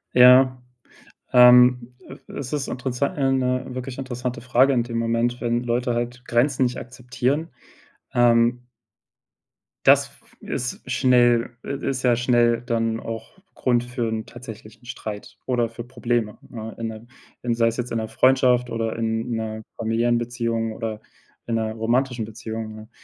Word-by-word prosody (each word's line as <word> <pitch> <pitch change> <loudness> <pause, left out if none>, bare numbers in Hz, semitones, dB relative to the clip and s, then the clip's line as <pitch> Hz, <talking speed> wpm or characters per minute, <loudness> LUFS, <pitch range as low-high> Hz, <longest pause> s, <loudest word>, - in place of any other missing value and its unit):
Ja, 125 +1 +7 0.7
ähm, 125 0 +6 0.3
e - - -12
es 135 -3 -5
ist 145 -2 -2
interessant 130 +6 -2
ja, 135 -2 +2
'ne 125 -1 +1
wirklich 130 0 -6
interessante 125 -2 -4
Frage 125 +3 +3
in 120 -2 +2
dem 115 -1 -5
Moment, 115 +1 0
wenn 120 0 -1
Leute 120 +1 0
halt 120 +1 -4
Grenzen 130 +2 +2
nicht 125 0 -1
akzeptieren. 130 +5 -2 0.6
Ähm 120 0 +3 1.2
Das - - +6
f - - -26
ist 125 +1 -5
schnell 120 -2 +3
i - - -7 0.2
ist 130 -2 -3
ja 125 -2 +4
schnell 120 -1 +2
dann 115 -2 -1
auch 115 +8 -7 0.2
Grund 120 -2 +1
für 120 -1 -3
'n 110 0 -3
tatsächlichen 115 -1 -12
Streit 105 -3 -7
oder 120 -2 +1
für 115 +1 -8
Probleme, 120 -3 -2
ne, 110 -1 -7
in 115 - -2
'ne 110 +1 -8 0.4
in 120 -1 0
sei 115 0 +2
es 115 - -1
jetzt 125 0 -4
in 115 - -1
'ner 110 - -3
Freundschaft 125 0 +3
oder 115 -1 -2
in 115 +1 -2
'ner 110 -1 -4 0.2
familiären 115 +2 +1
Beziehung 115 -1 -2
oder 110 -1 -5 0.5
in 115 - -1
'ner 110 -1 -1
romantischen 120 +2 0
Beziehung, 110 0 -6
ne? 110 +1 -12
120 Hz, 155 wpm, -23 LUFS, 115-125 Hz, 1.2 s, Ja